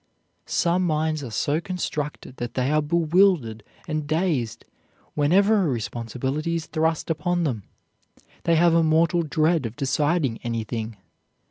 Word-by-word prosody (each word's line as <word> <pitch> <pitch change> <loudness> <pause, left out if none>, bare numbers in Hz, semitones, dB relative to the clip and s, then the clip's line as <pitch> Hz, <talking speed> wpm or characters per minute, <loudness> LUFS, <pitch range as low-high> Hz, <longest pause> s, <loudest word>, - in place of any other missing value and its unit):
Some 175 +1 +1
minds 155 -2 0
are 125 - -5
so 145 +8 0
constructed 150 -7 -4
that 120 -1 -5
they 130 +2 +1
are 155 0 +3
bewildered 160 - +2 0.2
and 155 -2 -2
dazed 155 - -1 0.5
whenever 195 +8 +3
a 180 - +1
responsibility 130 +6 -2
is 165 -1 -3
thrust 160 +1 -1
upon 175 +2 0
them; 120 - -2 0.8
they 170 - +4
have 170 +1 +4
a 165 - +5
mortal 165 +2 +3
dread 155 -2 +1
of 115 - -10
deciding 145 -1 0
anything. 115 -1 -4
155 Hz, 135 wpm, -24 LUFS, 130-170 Hz, 0.8 s, a